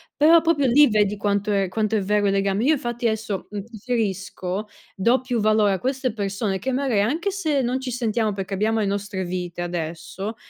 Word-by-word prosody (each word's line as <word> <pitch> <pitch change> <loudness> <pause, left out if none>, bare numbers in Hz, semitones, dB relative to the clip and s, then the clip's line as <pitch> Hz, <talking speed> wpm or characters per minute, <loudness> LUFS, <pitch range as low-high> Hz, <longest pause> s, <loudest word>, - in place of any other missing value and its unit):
però 325 +3 +6
proprio 295 -5 +2
lì 285 +5 +6
vedi 210 -2 +1
quanto 205 0 0
è 195 -2 +1
quanto 215 +3 -1
è 210 - +1
vero 205 +1 +1
il 195 - +2
legame. 195 +2 +1
Io 300 +5 +4
infatti 240 -3 -2
adesso 220 -3 -3
uhm, 205 -1 -5
preferisco, 205 -3 -3 0.3
do 235 +7 +3
più 250 -2 -2
valore 215 -1 +3
a 190 - -2
queste 260 +1 -1
persone 200 -2 -2
che 265 - -2
magari, 255 -5 +1
anche 320 - 0
se 310 -8 0
non 250 +2 0
ci 260 - -4
sentiamo, 230 -3 0
perché 195 0 -5
abbiamo 220 +3 +1
le - - +1
nostre 200 -1 -2
vite 175 -1 -4
adesso, 175 +4 -5
210 Hz, 200 wpm, -23 LUFS, 195-245 Hz, 0.3 s, però